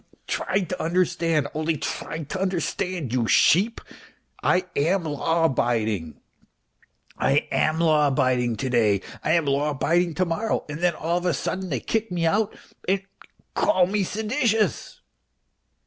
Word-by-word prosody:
Try 195 - -1
to 180 0 -4
understand, 165 -3 +1
only 155 +1 -1
try 160 +2 -4
to 185 +6 -5
understand, 180 - -2
you 120 -3 +1
sheep. 200 - +4 0.6
I 185 0 +2
am 170 +6 +1
law 165 +2 0
abiding. 110 - 0 1.0
I - - +2
am 155 +1 +1
law 155 -3 +3
abiding 130 -3 +1
to 130 +4 -3
day, 105 -5 +3 0.2
I 155 - +2
am 170 -2 +2
law 140 +2 +1
abiding 170 +4 +1
to 185 - +1
morrow, 195 +7 -1
and 150 +1 -6
then 175 -1 +1
all 170 +3 -1
of 180 - -3
a 175 - +2
sudden 190 0 -3
they 130 -6 -2
kick 225 -2 -2
me 170 -2 0
out 205 +5 +1 0.3
and 195 +1 +1 0.5
call 245 - +3
me 200 +2 0
seditious." 220 +2 -1
165 Hz, 150 wpm, -24 LUFS, 145-185 Hz, 1.0 s, sheep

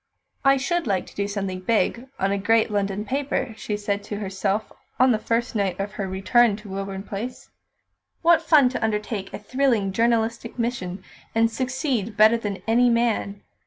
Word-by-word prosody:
"I 275 0 +5
should 340 +3 -1
like 195 -3 0
to - - -16
do 200 0 -1
something 195 -2 -3
big 230 +5 0
on 195 +1 0
a 200 - +1
great 225 +2 +2
London 200 0 -1
paper," 270 -2 -2
she 210 -1 -3
said 205 -1 -2
to 210 - -5
herself 200 +1 -2 0.3
on 255 0 +6
the 220 - +2
first 235 +3 -1
night 195 -4 -1
of 200 +1 -3
her 205 -2 -4
return 200 +4 +3
to 210 0 -11
Woburn 195 0 -4
Place. 215 +5 -6 0.7
"What 335 -1 +5
fun 305 -5 +5
to 255 - -4
undertake 210 -2 -2
a - - -5
thrilling 230 -3 +1
journalistic 230 +2 0
mission, 200 -6 -3 0.3
and 225 0 +3
succeed 255 - -2
better 215 +2 +6
than 205 -4 -5
any 245 +2 +4
man! 230 -4 0
220 Hz, 175 wpm, -24 LUFS, 200-240 Hz, 0.7 s, on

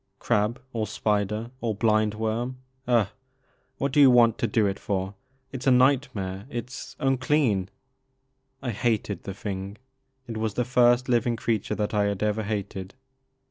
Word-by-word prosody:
Crab 105 +4 0
or 110 -2 -1
spider 105 +2 -1
or 115 -3 -1
blind 110 0 +2
worm 115 +4 -2
— 130 -1 -41
^ugh 120 -4 +4
I - - -17 0.7
What 140 0 -1
do 145 - +2
you 135 - +9
want 120 -2 +5
to 115 - +1
do 110 0 +2
it 100 0 -1
for? 95 -1 -2 0.4
It 130 - -6
's 130 - -4
a - - +6
nightmare 125 -7 +2
— - - -21
^it 120 -1 -5
's - - -8
unclean! 130 -7 +1 0.5
" 135 0 -47
I 125 - -1
hated 105 -3 -1
the 95 - -5
thing. 100 0 -5 0.5
It 115 -3 -6
was 110 -2 -2
the 125 - 0
first 125 0 +4
living 120 -1 +2
creature 110 -2 -1
that 105 0 -2
I 105 -1 +2
had 100 0 -1
ever 105 +1 +1
hated. 100 -1 -4
110 Hz, 180 wpm, -26 LUFS, 105-125 Hz, 0.7 s, you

